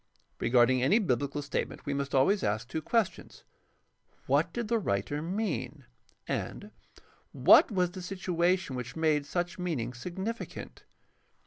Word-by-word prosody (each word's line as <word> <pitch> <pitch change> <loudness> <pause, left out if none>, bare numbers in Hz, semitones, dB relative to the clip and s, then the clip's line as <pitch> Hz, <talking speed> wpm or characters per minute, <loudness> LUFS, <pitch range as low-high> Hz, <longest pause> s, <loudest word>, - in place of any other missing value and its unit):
Regarding 125 +1 +4
any 160 - +4
biblical 145 - -1
statement 140 - -4
we 145 - -1
must 140 0 -2
always 185 +10 +4
ask 110 +3 -1
two 160 +5 -3
questions: 225 +2 -1 0.8
What - - +2
did 235 -2 -3
the 230 +1 +1
writer 145 - -1
mean? 155 - -3 0.4
and - - -4 0.6
What - - +7
was 180 -3 +1
the 185 - -8
situation 180 -3 0
which 125 -1 -6
made 155 -3 +1
such 175 0 -2
meaning 140 -10 -2
significant 190 - -6
160 Hz, 130 wpm, -30 LUFS, 130-185 Hz, 0.8 s, What